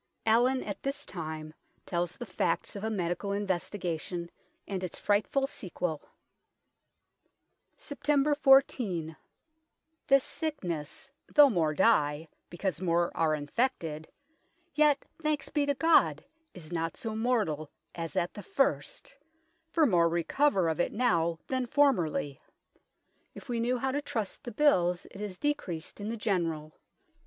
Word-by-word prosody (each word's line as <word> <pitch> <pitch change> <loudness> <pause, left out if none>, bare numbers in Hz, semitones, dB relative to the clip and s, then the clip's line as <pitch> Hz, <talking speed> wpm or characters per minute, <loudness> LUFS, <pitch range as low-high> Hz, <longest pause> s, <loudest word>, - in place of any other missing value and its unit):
Allin 245 +4 +3
at 200 - -6
this 280 +1 -3
time 155 -3 -6 0.3
tells 175 -1 -2
the 240 - -6
facts 180 -3 -1
of 200 - -6
a 220 - 0
medical 190 -1 -2
investigation 180 -3 -3 0.4
and 190 -2 -3
its 180 - -4
frightful 210 +7 +1
sequel 180 - -4 0.9
" - - -49
Sept. 290 0 +1
14. 240 - +3 0.9
This 275 -1 +5
sicknes, 195 - -4 0.2
though 290 -2 +7
more 160 -6 +1
dye, 155 -6 +3 0.2
because 185 +1 -3
more 170 -1 +1
are 160 -2 +2
infected, 160 - -2 0.7
yet, 295 -1 +3 0.2
thankes 305 -3 -1
bee 290 -2 0
to 285 - +1
God 210 - +3 0.3
is 165 -3 -11
not 165 -1 -2
so 225 - -4
mortall 215 -10 0 0.3
as 165 -1 -5
at 175 - 0
the 205 - -8
first, - - -1 0.6
for 325 -1 +3
more 175 -8 +4
recover 185 - +2
of 160 -1 -1
it - - +1
now 170 -8 +1
than 260 -1 -1
formerly. 175 - +1 0.9
If - - -11
we 240 -2 -1
knew 245 +2 +1
how 265 +2 -1
to 290 +2 -1
trust 220 -8 -4
the 240 - -5
bills 180 -10 +3
it 200 - -9
is 200 -3 -5
decreased 200 - -3
in 205 - -3
the 230 - -3
generall. 165 -8 -1
200 Hz, 135 wpm, -30 LUFS, 165-265 Hz, 0.9 s, though